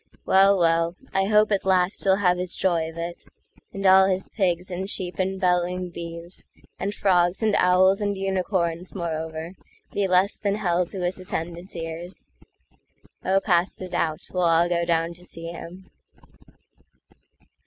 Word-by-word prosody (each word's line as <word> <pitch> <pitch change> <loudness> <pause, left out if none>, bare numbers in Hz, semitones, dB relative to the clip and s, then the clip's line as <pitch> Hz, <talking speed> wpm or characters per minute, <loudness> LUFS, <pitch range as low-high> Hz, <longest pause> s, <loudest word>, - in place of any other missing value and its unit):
Well, 195 +1 +5
well,I 170 +4 0
hope 210 0 +4
at 200 - +1
last 185 0 +2
he'll 190 -1 +4
have 180 -3 +2
his 180 0 -2
joy 170 -4 0
of 165 - -12
it, 170 +1 -5 0.5
And 195 0 -5
all 190 0 +7
his 190 0 -1
pigs 180 -3 -1
and 190 +2 -4
sheep 180 -2 -3
and 190 0 -1
bellowing 180 -1 0
beeves, 170 +1 -8 0.3
And 200 - -2
frogs 180 -1 +1
and 215 -1 +2
owls 185 +2 +4
and 205 -1 -1
unicorns, 185 -2 -2
moreover, 160 -1 -4 0.4
Be 200 -1 0
less 185 +2 +3
than 200 -2 0
hell 180 -4 0
to 190 +1 -6
his 180 +1 -2
attendant 175 0 -5
ears. 165 +2 -6 1.0
Oh, 190 +1 +3
past 180 -2 +1
a 185 - -6
doubt 165 -3 -1
we'll 180 - 0
all 170 0 +4
go 170 -1 0
down 165 0 0
to 175 +1 -11
see 165 -1 -8
him. 180 +2 -10
180 Hz, 155 wpm, -24 LUFS, 170-190 Hz, 1.0 s, all